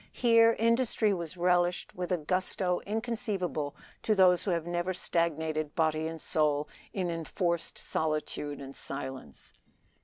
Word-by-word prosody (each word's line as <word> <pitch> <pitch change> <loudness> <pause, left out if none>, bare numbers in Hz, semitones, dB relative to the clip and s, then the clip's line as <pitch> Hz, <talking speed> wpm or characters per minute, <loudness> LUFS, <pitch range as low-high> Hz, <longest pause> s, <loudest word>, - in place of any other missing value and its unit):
Here 230 -1 +5
industry 230 -2 +2
was 170 -1 -5
relished 175 0 +1
with 180 +1 -4
a 180 - +3
gusto 180 +2 0
inconceivable 210 - -2 0.3
to 215 - +2
those 180 -2 +5
who - - 0
have 170 -2 0
never 175 +1 -1
stagnated 160 -3 -1
body 160 -1 +1
and 165 0 -6
soul 150 -1 +1 0.2
in 180 -3 -1
enforced 170 +1 -2
solitude 150 -2 -2
and 135 0 -9
silence. 130 - -7
175 Hz, 130 wpm, -30 LUFS, 155-190 Hz, 0.3 s, Here